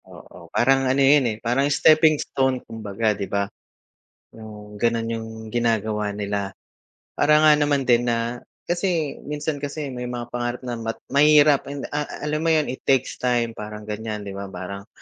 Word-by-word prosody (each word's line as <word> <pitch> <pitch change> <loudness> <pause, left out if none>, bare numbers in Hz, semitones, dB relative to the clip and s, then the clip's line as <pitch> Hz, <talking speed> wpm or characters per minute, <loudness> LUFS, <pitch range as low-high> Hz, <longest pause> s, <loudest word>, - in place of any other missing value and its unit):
Oo, - - -14
parang 135 +1 +3
ano 130 - +2
'yon, 135 -2 +5
eh, 110 - -3
parang 135 +5 +2
steping 155 +2 +5
stone 130 -3 -1
kumbaga, 110 -1 -2
'di 100 -1 -5
ba? 100 0 0 0.9
Yung 105 -1 -11
gano'n 115 0 0
yung 115 -1 -4 0.2
ginagawa 110 -3 0
nila 100 -1 -3 0.6
parang 150 +1 +4
nga 155 - +8
naman 145 -2 +1
din 120 0 +3
na 120 +1 -1 0.2
kasi 175 -4 -1
minsan 150 0 -3
kasi 145 -1 -5
may 125 -1 -5
mga 120 -1 -6
pangarap 120 +1 -3
na 120 -2 -4
mat 115 0 -3 0.2
mahirap, 145 0 +5 0.2
a 150 0 -2 0.2
alam 150 +1 -1
mo 165 - 0
'yon 155 -4 +2
it 130 - -8
takes 130 -2 +1
time, 120 -2 +1
parang 105 -1 -8
gan'yan, 105 0 -5
'di 100 - -6
ba? 100 0 -6
Parang 100 +2 -7
120 Hz, 170 wpm, -23 LUFS, 110-145 Hz, 0.9 s, nga